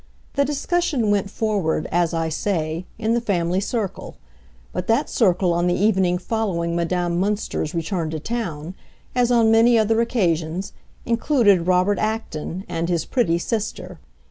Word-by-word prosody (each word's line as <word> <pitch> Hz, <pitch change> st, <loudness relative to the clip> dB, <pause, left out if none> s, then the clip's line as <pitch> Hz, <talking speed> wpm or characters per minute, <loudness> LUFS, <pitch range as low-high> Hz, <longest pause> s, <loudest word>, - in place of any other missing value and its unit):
The 280 Hz, -, +2 dB
discussion 295 Hz, -5 st, 0 dB
went 200 Hz, -1 st, +1 dB
forward, 200 Hz, -8 st, -1 dB
as 170 Hz, -1 st, +2 dB
I 165 Hz, -1 st, -1 dB
say, 160 Hz, 0 st, -2 dB
in 220 Hz, +1 st, 0 dB
the 235 Hz, -, +1 dB
family 180 Hz, -4 st, 0 dB
circle; 210 Hz, -1 st, -3 dB, 0.6 s
but 180 Hz, 0 st, -3 dB
that 225 Hz, +1 st, +1 dB
circle 180 Hz, -5 st, +2 dB
on 175 Hz, +1 st, +1 dB
the 175 Hz, -, +2 dB
evening 190 Hz, -3 st, +2 dB
following 175 Hz, -4 st, -2 dB
Madame 175 Hz, 0 st, 0 dB
Münster's 200 Hz, -5 st, -2 dB
return 165 Hz, 0 st, -2 dB
to 160 Hz, 0 st, -4 dB
town, 175 Hz, -5 st, -4 dB, 0.4 s
as 245 Hz, -1 st, +2 dB
on 230 Hz, -2 st, +4 dB
many 230 Hz, +1 st, +5 dB
other 225 Hz, +1 st, +3 dB
occasions, 180 Hz, -6 st, -1 dB, 0.3 s
included 230 Hz, -, +3 dB
Robert 185 Hz, +2 st, +3 dB
Acton 215 Hz, -4 st, -3 dB
and 165 Hz, 0 st, -2 dB
his 170 Hz, -3 st, 0 dB
pretty 175 Hz, -10 st, +1 dB
sister. 215 Hz, +4 st, -4 dB
190 Hz, 145 wpm, -22 LUFS, 170-225 Hz, 0.6 s, many